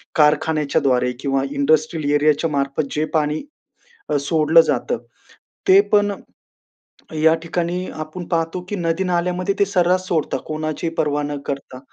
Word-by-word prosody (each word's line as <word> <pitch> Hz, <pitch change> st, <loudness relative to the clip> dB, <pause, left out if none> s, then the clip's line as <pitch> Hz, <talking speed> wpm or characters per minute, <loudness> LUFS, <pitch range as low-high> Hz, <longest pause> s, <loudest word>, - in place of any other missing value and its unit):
कारखान्याच्या 150 Hz, 0 st, +2 dB
द्वारे 125 Hz, -2 st, +2 dB
किंवा 135 Hz, -1 st, 0 dB
इंडस्ट्रियल 150 Hz, +1 st, +1 dB
एरियाच्या 150 Hz, +2 st, +2 dB
मार्फत, 140 Hz, +1 st, -1 dB
जे 155 Hz, +1 st, +1 dB
पाणी 150 Hz, -, 0 dB, 0.7 s
अ, 150 Hz, -, +1 dB
सोडलं 160 Hz, +2 st, +4 dB
जातं, 125 Hz, -, -1 dB, 0.7 s
ते 190 Hz, +1 st, +8 dB
पण 205 Hz, -1 st, +4 dB, 1.1 s
या 160 Hz, 0 st, +6 dB
ठिकाणी, 175 Hz, +2 st, -2 dB
आपण 155 Hz, +3 st, -6 dB
पाहतो, 165 Hz, +1 st, -1 dB
की 205 Hz, -, -3 dB
नदी-नाल्यामध्ये 180 Hz, +2 st, 0 dB
ते 200 Hz, -, +5 dB
सर्रास 185 Hz, -1 st, +1 dB
सोडता 160 Hz, -5 st, 0 dB
कोणाची 155 Hz, +1 st, -3 dB
पर्वा 150 Hz, -1 st, +1 dB
न 145 Hz, 0 st, -3 dB
करता 135 Hz, -2 st, -5 dB
155 Hz, 130 wpm, -20 LUFS, 145-175 Hz, 1.1 s, ते